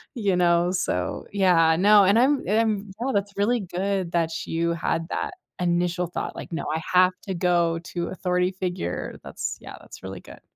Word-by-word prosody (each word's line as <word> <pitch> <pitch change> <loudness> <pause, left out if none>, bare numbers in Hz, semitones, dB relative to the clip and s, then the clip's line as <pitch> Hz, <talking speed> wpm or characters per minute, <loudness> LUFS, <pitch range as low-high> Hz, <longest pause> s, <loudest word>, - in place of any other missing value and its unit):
you 205 -5 +1
know? 175 0 +3
So 90 - -2
yeah, 175 -5 +4
no 205 +2 +6
and 200 +4 +4
I'm 275 +3 +3
I'm 210 -2 +1
no 270 - 0
that's 200 0 -1
really 230 +4 +2
good 190 -1 -2
that 165 -1 -1
you 165 +1 0
had 165 -1 -1
that 425 - -2 0.3
initial 175 0 0
thought, 175 - -5
like, - - -8
no, 165 - -3
"I 160 - -2
have 185 0 +6 0.2
to 190 - -2
go 170 -1 +2 0.2
to 170 -1 -2
authority 180 -1 0
figure." 185 -1 -4
That's, - - -5
yeah, - - -9
that's - - -13
really - - -7
good. - - -14
180 Hz, 180 wpm, -24 LUFS, 170-200 Hz, 0.3 s, no